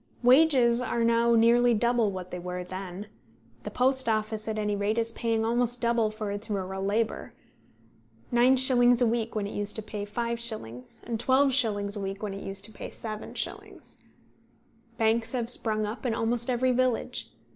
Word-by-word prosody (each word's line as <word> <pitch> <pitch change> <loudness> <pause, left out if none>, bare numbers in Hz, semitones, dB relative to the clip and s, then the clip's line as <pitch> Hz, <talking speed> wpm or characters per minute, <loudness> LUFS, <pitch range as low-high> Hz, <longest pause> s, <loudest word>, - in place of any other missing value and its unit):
Wages 250 -3 +5
are 240 -1 -1
now 235 0 +3
nearly 235 +1 +4
double 235 -1 +2
what 185 -1 -7
they 180 - -5
were 180 +1 -5
then. 185 +1 -7 0.6
The - - -6
Post 260 0 +1
Office 215 0 -1
at 220 -1 -2
any 210 -1 -1
rate 205 +2 -1
is 230 0 0
paying 225 -1 -1
almost 240 +1 0
double 235 -2 +2
for 215 -1 -5
its 205 +2 -3
rural 190 -1 -3
labour, 215 +3 -1 1.0
9s. 245 0 +5
a 245 - +4
week 230 0 -1
when 210 -2 -1
it 200 - -6
used 205 0 -2
to 220 - -3
pay 210 -1 -6
5s., 220 - -5
and 230 -1 -4
12s. 240 -6 +2
a - - -4
week 195 +1 -5
when 205 -2 -3
it 195 - -7
used 195 +1 -5
to 220 - -10
pay - - -8
7s. 215 -1 -6 1.0
Banks 225 +1 +1
have 240 -2 -2
sprung 215 -3 -1
up 215 +3 -6
in 240 -3 0
almost 235 +2 0
every 255 +1 +2
village. 250 -1 -1
225 Hz, 170 wpm, -27 LUFS, 205-240 Hz, 1.0 s, Wages